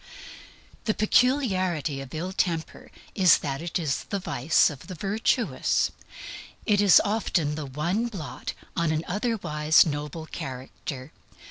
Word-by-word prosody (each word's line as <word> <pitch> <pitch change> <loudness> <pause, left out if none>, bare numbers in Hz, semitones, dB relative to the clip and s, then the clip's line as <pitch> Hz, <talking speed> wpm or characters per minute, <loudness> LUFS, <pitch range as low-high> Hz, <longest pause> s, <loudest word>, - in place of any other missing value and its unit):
The 215 - +1
peculiarity 185 - +1
of 135 -1 -10
ill 180 +4 -4
temper 165 -4 -2 0.2
is 185 -5 +6
that 140 0 -4
it 170 0 -2
is 155 -6 -2
the 200 - -2
vice 160 -2 +2
of 140 - -11
the 185 - -7
virtuous. 205 - 0 0.7
It 205 -1 +3
is 200 -3 +7
often 185 -8 0
the 150 -1 -5
one 170 - -1
blot 190 -10 -6 0.2
on 170 -3 +1
an 160 0 -1
otherwise 180 -7 +2
noble 150 +1 -4
character. 130 -1 -7
170 Hz, 130 wpm, -26 LUFS, 150-200 Hz, 0.7 s, is